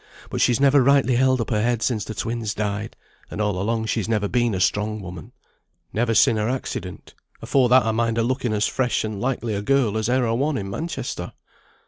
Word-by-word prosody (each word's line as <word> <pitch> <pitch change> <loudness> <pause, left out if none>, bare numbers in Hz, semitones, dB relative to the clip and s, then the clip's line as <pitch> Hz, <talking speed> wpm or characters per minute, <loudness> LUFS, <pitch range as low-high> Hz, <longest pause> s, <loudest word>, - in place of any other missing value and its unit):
But - - -2
she's 120 -2 +3
never 140 0 +5
rightly 130 -1 +3
held 130 0 +3
up 115 - -4
her 105 -2 +1
head 120 0 0
since 110 -5 0
the 110 - -7
twins 115 -2 -3
died; 105 +1 -3 0.3
and - - -7
all 105 -3 0
along 110 +2 -1
she 110 - -1
has 110 - -4
never 105 -2 +1
been 120 -2 +1
a - - -2
strong 105 +3 0
woman." 90 -4 -9 0.6
"Never 115 +1 0
sin' 110 - +4
her 105 +2 0
accident. 100 -8 -5 0.3
Afore 125 +1 +2
that 130 0 +5
I 110 - +1
mind 115 0 0
her 115 - +2
looking 125 -1 -1
as 105 0 +1
fresh 125 -2 0
and 110 -2 -4
likely 120 -3 -2
a 100 - -2
girl 115 -2 +1
as 110 +1 -1
e'er 125 0 +2
a 115 - 0
one 140 +5 0
in 95 -1 -5
Manchester." 165 +11 -5
115 Hz, 220 wpm, -23 LUFS, 105-125 Hz, 0.6 s, never